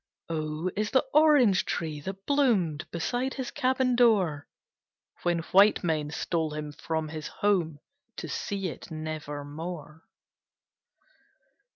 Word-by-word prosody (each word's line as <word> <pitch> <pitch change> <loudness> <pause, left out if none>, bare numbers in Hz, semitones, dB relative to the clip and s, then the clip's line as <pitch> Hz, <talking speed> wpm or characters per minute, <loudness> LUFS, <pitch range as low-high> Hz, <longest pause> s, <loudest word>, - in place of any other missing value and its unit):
O 155 0 -3
O 185 - 0
is 210 0 0
the 260 - +3
Orange 290 -10 +5
tree, 155 -3 -3
that 195 +4 -7
bloomed 205 - +1
Beside 245 +10 -2
his 260 -3 -4
cabin 260 -2 +1
door, 195 -12 +3 0.7
When 175 -1 0
white 200 +3 +6
men 155 -3 0
stole 160 0 -2
him 150 -1 -5
from 160 +1 -3
his 155 -1 -5
home 180 -7 0 0.4
To - - -5
see 195 -2 -3
it - - -9
never 155 -2 -5
more. 160 +1 -7
170 Hz, 130 wpm, -28 LUFS, 155-215 Hz, 0.7 s, white